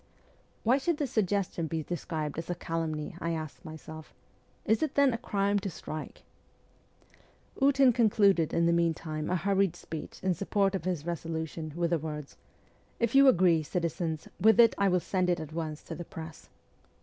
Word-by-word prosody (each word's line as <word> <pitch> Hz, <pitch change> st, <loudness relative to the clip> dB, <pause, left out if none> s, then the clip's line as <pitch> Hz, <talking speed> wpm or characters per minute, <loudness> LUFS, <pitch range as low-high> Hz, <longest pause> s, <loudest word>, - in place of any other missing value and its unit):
' -, -, -36 dB
Why 250 Hz, +5 st, +4 dB
should 325 Hz, +3 st, 0 dB
this 285 Hz, -4 st, -2 dB
suggestion 195 Hz, -5 st, 0 dB
be 160 Hz, 0 st, -3 dB
described 155 Hz, -2 st, -4 dB
as 165 Hz, -, -7 dB
a 175 Hz, -, -1 dB
calumny? 160 Hz, -3 st, -3 dB
' -, -, -12 dB
I 170 Hz, +1 st, -1 dB
asked 155 Hz, 0 st, -6 dB
myself. 155 Hz, -1 st, -10 dB, 0.3 s
' -, -, -37 dB
Is 220 Hz, -, +2 dB
it, 310 Hz, -3 st, -1 dB
then, 280 Hz, -3 st, +4 dB
a -, -, -1 dB
crime 200 Hz, -3 st, 0 dB
to 200 Hz, 0 st, -4 dB
strike? 155 Hz, -2 st, -7 dB, 0.7 s
' -, -, -25 dB
Ootin 270 Hz, -2 st, +5 dB
concluded 200 Hz, -7 st, +3 dB
in 170 Hz, -, +2 dB
the 170 Hz, -, +3 dB
meantime 160 Hz, -2 st, -1 dB
a 180 Hz, -, +1 dB
hurried 195 Hz, -1 st, +1 dB
speech 160 Hz, -2 st, -8 dB
in 190 Hz, -1 st, +2 dB
support 195 Hz, +2 st, 0 dB
of 190 Hz, -3 st, -3 dB
his 175 Hz, -5 st, -2 dB
resolution 160 Hz, -1 st, -4 dB
with 170 Hz, 0 st, 0 dB
the 170 Hz, -, +2 dB
words, 150 Hz, -2 st, -6 dB, 0.3 s
' -, -, -35 dB
If 235 Hz, -1 st, +1 dB
you 275 Hz, 0 st, +7 dB
agree, 175 Hz, -8 st, +5 dB
citizens, 165 Hz, 0 st, -3 dB
with 220 Hz, +4 st, +5 dB
it 230 Hz, -2 st, +7 dB
I 200 Hz, -, +2 dB
will 180 Hz, -1 st, +3 dB
send 185 Hz, 0 st, 0 dB
it 175 Hz, -, +1 dB
at 155 Hz, -1 st, -7 dB
once 155 Hz, -2 st, -4 dB
to -, -, -7 dB
the 175 Hz, -, -6 dB
press.' 160 Hz, 0 st, -10 dB
175 Hz, 195 wpm, -29 LUFS, 160-200 Hz, 0.7 s, you